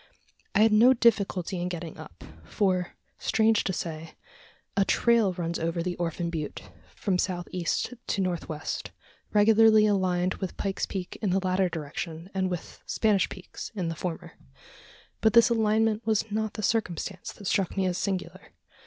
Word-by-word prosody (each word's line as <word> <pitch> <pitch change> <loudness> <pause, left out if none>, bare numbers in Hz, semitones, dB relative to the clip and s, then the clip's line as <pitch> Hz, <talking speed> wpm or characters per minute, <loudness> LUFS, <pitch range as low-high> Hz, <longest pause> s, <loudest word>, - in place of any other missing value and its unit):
I 205 - +5
had 220 0 +6
no 240 +5 +7
difficulty 195 -6 +1
in 180 - -2
getting 170 -2 -6
up 85 - -11 0.2
for, 180 - 0 0.2
strange 220 -1 +2
to - - 0
say, 160 -3 -5 0.6
a 200 - +4
trail 230 -1 +3
runs 170 -1 -3
over 165 +1 -1
the 180 0 -2
Orphan 170 0 -2
Butte, 155 -3 -5 0.2
from 185 -3 0
south 175 -2 -1
east 180 +6 -1
to - - -1
north 180 -3 -2
west, 155 -1 -4 0.4
regularly 220 +1 +6
aligned 185 -3 +1
with 190 - -4
Pike's 195 -2 -2
Peak 185 -2 -5
in 210 - 0
the 190 +1 +1
latter 185 0 +2
direction, 165 +3 -6
and 190 -1 0
with 180 -2 -6
Spanish 210 -4 +2
Peaks 185 - -8
in 180 -5 -2
the 165 - -4
former! 170 +1 -5 0.9
But 220 -1 +3
this 235 0 +6
alignment 220 0 +2
was 220 0 +1
not 220 0 -1
the 215 - -5
circumstance 195 -4 -1
that 200 - -12
struck 190 +1 0
me 190 - +2
as 180 -1 0
singular. 190 -2 -4
185 Hz, 165 wpm, -27 LUFS, 175-215 Hz, 0.9 s, no